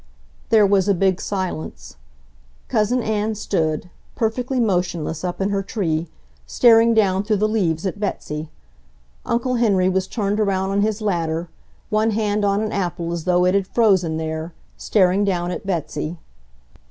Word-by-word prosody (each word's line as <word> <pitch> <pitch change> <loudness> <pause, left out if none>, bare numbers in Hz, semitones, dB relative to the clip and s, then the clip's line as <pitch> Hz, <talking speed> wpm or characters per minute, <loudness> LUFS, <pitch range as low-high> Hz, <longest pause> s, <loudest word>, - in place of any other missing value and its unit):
There 220 -3 +5
was 195 -1 +2
a 200 - +4
big 190 +1 +1
silence; 185 -5 -5 0.7
Cousin 230 +3 +1
Ann 215 0 -1
stood, 170 -5 -2 0.2
perfectly 250 +3 -1
motionless 175 -7 -1
up 180 -1 -3
in 195 +1 0
her 200 -1 0
tree, 170 -5 -2 0.4
staring 230 - +5
down 195 -3 +3
through 210 +1 0
the 215 +2 +2
leaves 185 -6 0
at 190 +2 -3
Betsy. 155 -6 -4 0.8
Uncle 245 +1 0
Henry 195 -6 +3
was 190 0 0
turned 205 -1 -1
around 195 -2 0
on 200 +1 +1
his 215 +1 0
ladder, 170 -4 -1 0.4
one 215 +1 +2
hand 210 -1 0
on 200 0 +2
an 215 - -2
apple 175 -3 -2
as 170 -2 -5
though 180 0 +3
it 180 - +3
had 195 -1 +1
frozen 190 -9 +2
there, 160 +1 -4 0.2
staring 195 -1 +2
down 180 -3 -1
at 195 +2 -6
Betsy. 160 -2 -3
195 Hz, 155 wpm, -21 LUFS, 175-215 Hz, 0.8 s, There